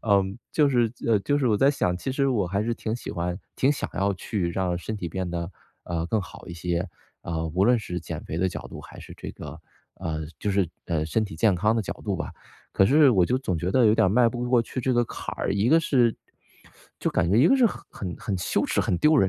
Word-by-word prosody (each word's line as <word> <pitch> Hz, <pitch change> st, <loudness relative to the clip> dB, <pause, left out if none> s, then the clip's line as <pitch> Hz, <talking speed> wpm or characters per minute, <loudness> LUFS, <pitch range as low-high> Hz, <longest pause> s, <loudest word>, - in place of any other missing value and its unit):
呃， 100 Hz, -3 st, +4 dB, 0.3 s
就 150 Hz, -2 st, +4 dB
是 120 Hz, -4 st, +2 dB
呃， 110 Hz, -3 st, +4 dB
就 145 Hz, +7 st, +1 dB
是 130 Hz, -, +1 dB
我 105 Hz, -, +3 dB
在 135 Hz, +6 st, +4 dB
想， 90 Hz, -10 st, 0 dB
其 130 Hz, +8 st, -4 dB
实 135 Hz, 0 st, +1 dB
我 105 Hz, -8 st, +1 dB
还 100 Hz, +3 st, -1 dB
是 120 Hz, -, -1 dB
挺 110 Hz, 0 st, -3 dB
喜 -, -, -7 dB
欢 85 Hz, 0 st, -2 dB, 0.2 s
挺 135 Hz, -, +3 dB
想 145 Hz, -, -4 dB
要 100 Hz, 0 st, +1 dB
去 90 Hz, -1 st, -2 dB
让 90 Hz, -1 st, 0 dB
身 110 Hz, +4 st, -5 dB
体 90 Hz, -4 st, -4 dB
变 95 Hz, +2 st, -3 dB
得， 85 Hz, 0 st, -3 dB, 0.3 s
呃， 85 Hz, -1 st, -2 dB
更 110 Hz, +3 st, 0 dB
好 -, -, -12 dB
一 85 Hz, -, -6 dB
些， 85 Hz, +1 st, -2 dB, 0.3 s
呃， 80 Hz, -1 st, -3 dB
无 90 Hz, +5 st, +1 dB
论 125 Hz, +3 st, +5 dB
是 90 Hz, -4 st, -4 dB
减 -, -, -6 dB
肥 80 Hz, -, -4 dB
的 95 Hz, +1 st, +2 dB
角 -, -, -7 dB
度 -, -, -9 dB
还 -, -, -12 dB
是 -, -, -11 dB
这 -, -, -7 dB
个 75 Hz, +2 st, -9 dB, 0.3 s
呃， 80 Hz, -1 st, -4 dB, 0.2 s
就 105 Hz, -, -1 dB
是， 95 Hz, -3 st, +2 dB, 0.2 s
呃， 80 Hz, -3 st, 0 dB
身 110 Hz, +8 st, 0 dB
体 100 Hz, -, -8 dB
健 95 Hz, +3 st, +3 dB
康 105 Hz, +5 st, +2 dB
的 115 Hz, -, 0 dB
角 -, -, -4 dB
度 -, -, -1 dB
吧。 -, -, -4 dB, 0.4 s
可 95 Hz, -, +4 dB
是 145 Hz, +2 st, +6 dB
我 95 Hz, -6 st, +4 dB
就 125 Hz, -, +1 dB
总 95 Hz, -10 st, -2 dB
觉 90 Hz, +4 st, -2 dB
得 130 Hz, -, +4 dB
有 110 Hz, -, +5 dB
点 -, -, +4 dB
儿 -, -, +3 dB
迈 115 Hz, +4 st, +4 dB
不 120 Hz, +1 st, -4 dB
过 120 Hz, -2 st, +4 dB
去 130 Hz, -, -5 dB
这 130 Hz, +1 st, +1 dB
个 120 Hz, 0 st, +3 dB
坎 -, -, -6 dB
儿， -, -, -1 dB
一 100 Hz, +3 st, +1 dB
个 165 Hz, +4 st, +6 dB
是 125 Hz, -7 st, +2 dB, 0.8 s
就 -, -, 0 dB
感 85 Hz, -, +1 dB
觉 100 Hz, -, +3 dB
一 130 Hz, +7 st, +6 dB
个 270 Hz, -, +5 dB
是 250 Hz, -3 st, +5 dB
很 -, -, -4 dB
很 90 Hz, -4 st, -6 dB
很 100 Hz, -5 st, -3 dB
羞 -, -, 0 dB
耻、 -, -, +1 dB
很 -, -, 0 dB
丢 155 Hz, 0 st, +4 dB
人。 95 Hz, -, +4 dB
100 Hz, 285 characters per minute, -25 LUFS, 90-120 Hz, 0.8 s, 是